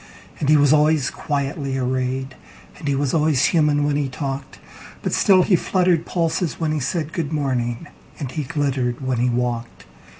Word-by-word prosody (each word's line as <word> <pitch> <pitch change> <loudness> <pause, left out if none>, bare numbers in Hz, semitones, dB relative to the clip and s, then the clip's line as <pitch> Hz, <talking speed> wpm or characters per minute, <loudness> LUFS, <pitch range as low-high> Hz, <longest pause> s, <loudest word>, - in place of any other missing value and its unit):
And 145 - -1
he 155 - +6
was 145 0 +5
always 150 -2 +3
quietly 140 -1 -3
arrayed, 130 +1 -2 0.5
And 150 - -6
he 140 - +1
was 140 -1 0
always 150 -4 +3
human 150 -3 +2
when 145 0 +1
he 145 -2 -1
talked; 135 +1 -5 0.5
But - - -1
still 185 -2 +5
he 190 - +3
fluttered 180 -1 +1
pulses 165 -1 -1
when 160 -2 0
he 155 - 0
said,"Good 155 +2 -2
morning," 130 -3 -1 0.3
and 135 -4 -5
he 155 - -3
glittered 135 -4 -1
when 130 -2 0
he 125 +1 +2
walked. 120 -1 -3
145 Hz, 170 wpm, -21 LUFS, 130-155 Hz, 0.5 s, he